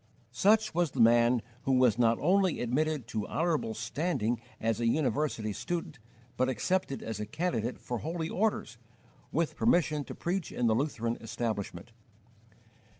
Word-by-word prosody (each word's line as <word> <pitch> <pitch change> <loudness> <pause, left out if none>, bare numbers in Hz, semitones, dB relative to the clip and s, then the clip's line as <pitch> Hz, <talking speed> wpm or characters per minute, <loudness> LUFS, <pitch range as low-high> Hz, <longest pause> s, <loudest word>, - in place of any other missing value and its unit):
Such 215 - +3
was 175 -1 +2
the 130 - -7
man 120 +1 +5 0.2
who 135 - +2
was 125 -3 +4
not 115 -1 +4
only 185 +2 +2
admitted 145 +2 0
to 110 -3 -3
honourable 160 -9 0
standing 120 -1 -1 0.2
as 115 0 0
a 120 - +1
university 135 -5 0
student, 155 - -4 0.4
but 130 0 +2
accepted 140 +2 -1
as 110 -2 -4
a 105 - -4
candidate 120 -3 -2
for 120 -2 -4
holy 160 +3 -3
orders, 185 - -1 0.5
with 165 +1 0
permission 160 -9 +2
to - - -8
preach 175 0 -2
in 125 - -1
the 115 - +4
Lutheran 115 -2 -1
establishment. 110 -3 -4
130 Hz, 150 wpm, -30 LUFS, 115-165 Hz, 0.5 s, man